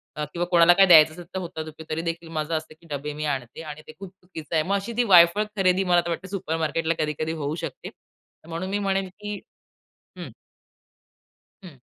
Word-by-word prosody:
अ, 150 Hz, -, -3 dB
किंवा 175 Hz, 0 st, -1 dB
कोणाला 170 Hz, 0 st, +7 dB
काही 195 Hz, +2 st, +5 dB
द्यायचं 155 Hz, -3 st, +8 dB
असेल 175 Hz, +2 st, -10 dB
तर 190 Hz, -, -2 dB
होता 170 Hz, -3 st, -6 dB, 0.3 s
तरी 155 Hz, +1 st, -2 dB
देखील 165 Hz, 0 st, -5 dB
माझं 155 Hz, +1 st, -2 dB
असतं 155 Hz, 0 st, -8 dB
की 170 Hz, -, -18 dB
डबे 145 Hz, +1 st, -5 dB
मी 155 Hz, +1 st, -4 dB
आणते 125 Hz, +2 st, -9 dB
आणि 155 Hz, -1 st, -8 dB
ते -, -, -9 dB
खूप 195 Hz, -1 st, -8 dB
चुकीचं 175 Hz, -4 st, -8 dB
आहे. 155 Hz, -, +3 dB
मग 195 Hz, +4 st, 0 dB
अशी 200 Hz, +4 st, -3 dB
ती 245 Hz, -, +4 dB
वायफळ 180 Hz, -1 st, +6 dB
खरेदी 190 Hz, 0 st, +3 dB
मला 175 Hz, -2 st, +3 dB
वाटते 170 Hz, +2 st, -4 dB
सुपरमार्केटला 165 Hz, -3 st, -1 dB
कधी-कधी 155 Hz, +1 st, -2 dB
होऊ 145 Hz, +2 st, -2 dB
शकते. 165 Hz, -, -6 dB, 0.6 s
म्हणून 170 Hz, +3 st, -4 dB
मी 200 Hz, +1 st, -1 dB
म्हणेन 195 Hz, -1 st, 0 dB
की 205 Hz, +2 st, -7 dB, 0.8 s
हं. -, -, -7 dB, 1.3 s
हं. 170 Hz, -7 st, -12 dB
170 Hz, 190 wpm, -24 LUFS, 155-190 Hz, 1.3 s, द्यायचं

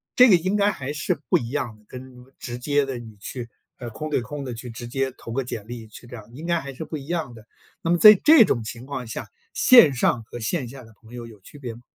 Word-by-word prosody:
这 250 Hz, 0 st, +7 dB
个 195 Hz, -, +7 dB
应 185 Hz, +5 st, -1 dB
该 205 Hz, 0 st, +3 dB
还 140 Hz, -6 st, -6 dB
是 150 Hz, -, -2 dB
不 -, -, +5 dB
一 115 Hz, -, -5 dB
样 125 Hz, -5 st, -3 dB
的， 105 Hz, -, -25 dB
跟 130 Hz, 0 st, -10 dB, 0.2 s
直 120 Hz, -1 st, -6 dB
接 145 Hz, +3 st, 0 dB
地 135 Hz, -2 st, -5 dB
你 110 Hz, -3 st, -12 dB
去， 120 Hz, +3 st, -7 dB, 0.3 s
呃， 120 Hz, -, -6 dB
空 155 Hz, +7 st, -6 dB
对 145 Hz, -, 0 dB
空 140 Hz, +5 st, -7 dB
地 125 Hz, -, -5 dB
去 115 Hz, +2 st, -8 dB
直 120 Hz, +1 st, -8 dB
接 135 Hz, +1 st, -2 dB
投 115 Hz, -, -8 dB
个 135 Hz, +2 st, -1 dB
简 110 Hz, -4 st, -7 dB
历 115 Hz, -2 st, -8 dB
去 115 Hz, +3 st, -14 dB
这 120 Hz, -, -10 dB
样， 110 Hz, -2 st, -12 dB
应 150 Hz, +6 st, -9 dB
该 170 Hz, -1 st, 0 dB
还 140 Hz, 0 st, -8 dB
是 155 Hz, -, -7 dB
不 155 Hz, -, -7 dB
一 140 Hz, -2 st, -8 dB
样 165 Hz, -7 st, -3 dB
的。 110 Hz, -2 st, -14 dB, 0.4 s
那 165 Hz, -, -1 dB
么 175 Hz, -, +3 dB
在 215 Hz, +4 st, +10 dB
这 305 Hz, -7 st, +8 dB
种 120 Hz, -, -1 dB
情 115 Hz, +2 st, -8 dB
况 130 Hz, -3 st, -5 dB
下， 110 Hz, -, -6 dB, 0.3 s
线 235 Hz, -, +7 dB
上 120 Hz, -1 st, 0 dB
和 120 Hz, -, -10 dB
线 125 Hz, +3 st, -2 dB
下 130 Hz, +1 st, -11 dB
的 115 Hz, -1 st, -17 dB
朋 115 Hz, +1 st, -16 dB
友 120 Hz, -1 st, -8 dB
有 110 Hz, -4 st, -15 dB
区 145 Hz, -, -15 dB
别 125 Hz, -4 st, -6 dB
吗？ 115 Hz, -, -14 dB
125 Hz, 295 characters per minute, -23 LUFS, 115-150 Hz, 0.4 s, 在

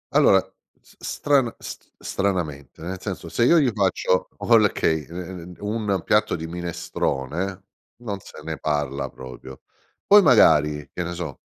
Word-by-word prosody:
Allora, -, -, +6 dB, 0.4 s
s -, -, -23 dB
strana 135 Hz, -5 st, +1 dB
s -, -, -7 dB, 0.2 s
stranamente, 85 Hz, -10 st, -3 dB
nel 90 Hz, +3 st, -5 dB
senso: 95 Hz, -4 st, -6 dB
se 115 Hz, +8 st, +2 dB
io 170 Hz, -, +6 dB
gli 135 Hz, -5 st, +3 dB
faccio 95 Hz, -2 st, +1 dB
okay, 105 Hz, -9 st, +3 dB
ehm, 85 Hz, -, -11 dB
ehm, 90 Hz, -1 st, -7 dB
d -, -, -18 dB
un 105 Hz, -2 st, -1 dB
piatto -, -, +2 dB
di 80 Hz, -, -5 dB
minestrone, 85 Hz, +1 st, -3 dB, 0.4 s
non 100 Hz, -4 st, -4 dB
se -, -, -12 dB
ne 80 Hz, 0 st, -4 dB
parla 70 Hz, -3 st, -1 dB
proprio. 65 Hz, +1 st, -11 dB, 0.4 s
Poi 205 Hz, +1 st, +8 dB
magari, 75 Hz, -, +4 dB
che 90 Hz, -, -3 dB
ne 85 Hz, +1 st, -4 dB
so, 85 Hz, -6 st, -6 dB
90 Hz, 150 wpm, -23 LUFS, 75-100 Hz, 0.4 s, Poi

